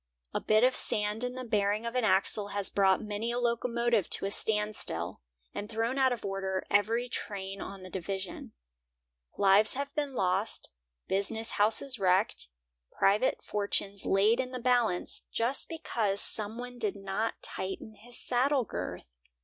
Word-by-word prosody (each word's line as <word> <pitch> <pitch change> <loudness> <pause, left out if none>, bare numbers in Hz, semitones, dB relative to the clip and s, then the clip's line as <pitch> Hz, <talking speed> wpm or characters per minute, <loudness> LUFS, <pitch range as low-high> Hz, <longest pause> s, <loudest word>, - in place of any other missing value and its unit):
A - - -1
bit 215 +1 +3
of 255 0 +4
sand 210 +2 +3
in 250 0 -2
the 255 - -5
bearing 210 -1 0
of 235 - -3
an 250 -1 0
axle 200 0 +3
has 200 -1 0
brought 195 0 +3
many 215 +2 -3
a 240 - -2
locomotive 235 -3 0
to - - +3
a 195 - -1
standstill, 210 - -1 0.3
and 205 - -5
thrown 230 +4 -1
out 260 -1 +4
of 240 -4 -4
order 190 -1 -2
every 225 +4 +2
train 195 -4 -5
on 195 -1 -8
the 185 - -9
division. 190 0 -5 0.8
Lives 205 +3 +5
have 280 +1 -4
been 290 -3 -2
lost, 190 +1 -1 0.4
business 220 +4 0
houses 225 +4 +1
wrecked, 185 - +1 0.4
private 205 +6 +2
fortunes 200 -1 -1
laid 210 +5 +3
in 255 -1 -1
the 255 0 -5
balance, 240 -7 0
just 240 +4 +1
because 225 -11 -1
some 215 +1 +3
one 245 0 -7
did 210 -4 -1
not 195 +3 -2
tighten 190 +3 -4
his 235 +3 -6
saddle 260 +2 +1
girth! - - -5
215 Hz, 155 wpm, -30 LUFS, 195-240 Hz, 0.8 s, Lives